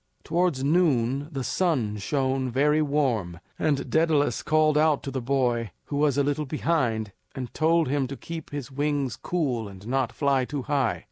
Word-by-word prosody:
Towards 170 Hz, -5 st, 0 dB
noon 140 Hz, -4 st, +2 dB
the 135 Hz, -3 st, -3 dB
sun 125 Hz, -, 0 dB
shone 130 Hz, +3 st, -1 dB
very 150 Hz, +5 st, +3 dB
warm, 125 Hz, -, 0 dB, 0.2 s
and 145 Hz, -3 st, 0 dB
Daedalus 160 Hz, -2 st, +2 dB
called 155 Hz, -1 st, +3 dB
out 150 Hz, -1 st, +3 dB
to 135 Hz, -, -4 dB
the 130 Hz, -1 st, -3 dB
boy 120 Hz, -3 st, 0 dB, 0.2 s
who 145 Hz, -, -4 dB
was 145 Hz, -2 st, +2 dB
a 140 Hz, -, +3 dB
little 145 Hz, +1 st, -1 dB
behind 130 Hz, -9 st, 0 dB, 0.2 s
and 125 Hz, -2 st, -6 dB
told 165 Hz, 0 st, +2 dB
him 135 Hz, 0 st, 0 dB
to 135 Hz, +1 st, -7 dB
keep 165 Hz, -2 st, -7 dB
his 145 Hz, -2 st, -6 dB
wings 140 Hz, -2 st, -1 dB
cool 130 Hz, -11 st, -2 dB
and 95 Hz, 0 st, -12 dB
not 130 Hz, 0 st, 0 dB
fly 140 Hz, -3 st, +1 dB
too 140 Hz, +1 st, -4 dB
high. 145 Hz, -1 st, 0 dB
140 Hz, 175 wpm, -26 LUFS, 125-150 Hz, 0.2 s, very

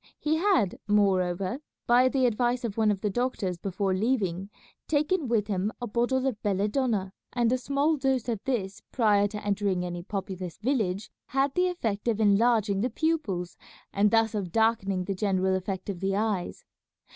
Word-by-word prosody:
He 310 Hz, +1 st, 0 dB
had, 345 Hz, -, +2 dB
moreover, 195 Hz, +1 st, +1 dB, 0.3 s
by 250 Hz, +2 st, +5 dB
the 260 Hz, -1 st, +2 dB
advice 245 Hz, +1 st, +1 dB
of 220 Hz, -4 st, -3 dB
one 220 Hz, -1 st, +2 dB
of 200 Hz, -2 st, 0 dB
the 210 Hz, -, 0 dB
doctors 195 Hz, -6 st, -2 dB
before 195 Hz, +1 st, -1 dB
leaving, 195 Hz, -3 st, 0 dB, 0.4 s
taken 305 Hz, +1 st, +1 dB
with 225 Hz, -3 st, +1 dB
him 200 Hz, 0 st, -1 dB
a 245 Hz, -, -3 dB
bottle 240 Hz, +4 st, 0 dB
of 250 Hz, -6 st, -2 dB
belladonna, 205 Hz, 0 st, 0 dB, 0.2 s
and 240 Hz, -1 st, +2 dB
a 255 Hz, -, +3 dB
small 280 Hz, +4 st, +1 dB
dose 265 Hz, -3 st, 0 dB
of 225 Hz, -4 st, -2 dB
this 200 Hz, -7 st, -2 dB
prior 210 Hz, -4 st, +3 dB
to 210 Hz, 0 st, -7 dB
entering 200 Hz, -3 st, 0 dB
any 175 Hz, -1 st, -4 dB
populous 185 Hz, -2 st, -5 dB
village 215 Hz, -5 st, -1 dB, 0.2 s
had 270 Hz, +1 st, +1 dB
the 360 Hz, +3 st, +2 dB
effect 230 Hz, -, -2 dB
of 225 Hz, -2 st, +1 dB
enlarging 210 Hz, -1 st, +3 dB
the 250 Hz, -, +1 dB
pupils 225 Hz, -, -1 dB, 0.4 s
and 205 Hz, +1 st, +3 dB
thus 225 Hz, 0 st, +2 dB
of 195 Hz, -5 st, -3 dB
darkening 215 Hz, -4 st, +1 dB
the 195 Hz, -, -2 dB
general 190 Hz, -1 st, +1 dB
effect 190 Hz, 0 st, -4 dB
of 195 Hz, -4 st, -4 dB
the 195 Hz, +1 st, 0 dB
eyes. 205 Hz, -3 st, -2 dB
210 Hz, 170 wpm, -27 LUFS, 195-245 Hz, 0.4 s, by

